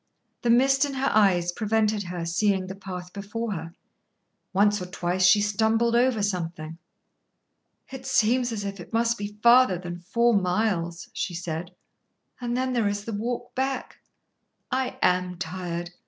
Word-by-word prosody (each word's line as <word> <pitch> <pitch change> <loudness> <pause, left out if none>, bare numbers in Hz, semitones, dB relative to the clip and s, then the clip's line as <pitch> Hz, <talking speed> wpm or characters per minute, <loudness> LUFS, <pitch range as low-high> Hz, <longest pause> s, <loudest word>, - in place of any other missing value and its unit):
The 240 - 0
mist 270 +4 +4
in 285 -2 -2
her 270 +1 0
eyes 180 -5 +3
prevented 215 0 0
her 175 -1 -4
seeing 190 +2 +1
the 190 - -6
path 180 -2 -8
before 210 +3 -4
her. 165 -2 -6 0.8
Once 205 +1 +3
or 180 - -5
twice 180 0 +1
she 205 +3 +6
stumbled 220 +3 +2
over 240 -3 +3
something. 165 -4 -3 1.1
"It 265 0 -8
seems 245 -1 +2
as 210 -2 -3
if 200 0 -5
it 175 - -11
must 230 +1 +2
be 205 -1 -7
farther 235 -5 +6
than 175 0 -7
four 235 +7 +2
miles," 180 -3 0
she 180 - -3
said. 170 +1 -5 0.6
"And 240 -1 -2
then 255 0 0
there 230 -4 +1
is 205 0 -2
the 230 - -4
walk 235 +4 -4
back. 265 0 -2 0.7
I 260 0 -1
am 180 0 +1
tired. 175 -1 -4
205 Hz, 155 wpm, -26 LUFS, 180-235 Hz, 1.1 s, she